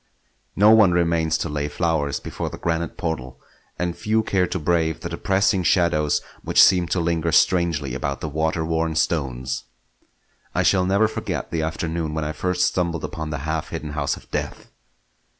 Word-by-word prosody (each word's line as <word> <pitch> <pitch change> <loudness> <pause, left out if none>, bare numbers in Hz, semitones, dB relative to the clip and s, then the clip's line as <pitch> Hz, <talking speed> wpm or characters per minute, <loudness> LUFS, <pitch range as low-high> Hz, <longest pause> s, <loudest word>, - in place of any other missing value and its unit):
No 105 +2 +6
one 105 -5 +6
remains 85 -2 +1
to - - -3
lay 75 0 -2
flowers 75 -2 -1
before - - -5
the - - -8
granite 85 -1 -2
portal, 65 -6 -4 0.4
and 90 -1 -2
few 110 +1 0
care 95 -3 +1
to - - -3
brave 80 -1 0
the 85 - -4
depressing 95 +3 +1
shadows 85 -4 +2 0.2
which - - +1
seem 90 -2 +6
to 90 - 0
linger 85 -1 0
strangely 85 -6 +2
about 70 +2 -3
the - - -4
water 80 +2 -1
worn 80 0 -1
stones. 65 -6 -1 0.9
I - - +2
shall 95 -2 +3
never 100 +3 +3
forget 105 - -4
the 80 -1 -1
afternoon 80 0 -3
when 80 - -1
first 90 +1 0
I - - +3
stumbled 85 -3 -2
upon 80 -1 -5
the 75 - -3
half 80 0 -2
hidden 75 - -5
house 70 -1 -1
of - - -17
death. - - -4
80 Hz, 175 wpm, -23 LUFS, 75-90 Hz, 0.9 s, No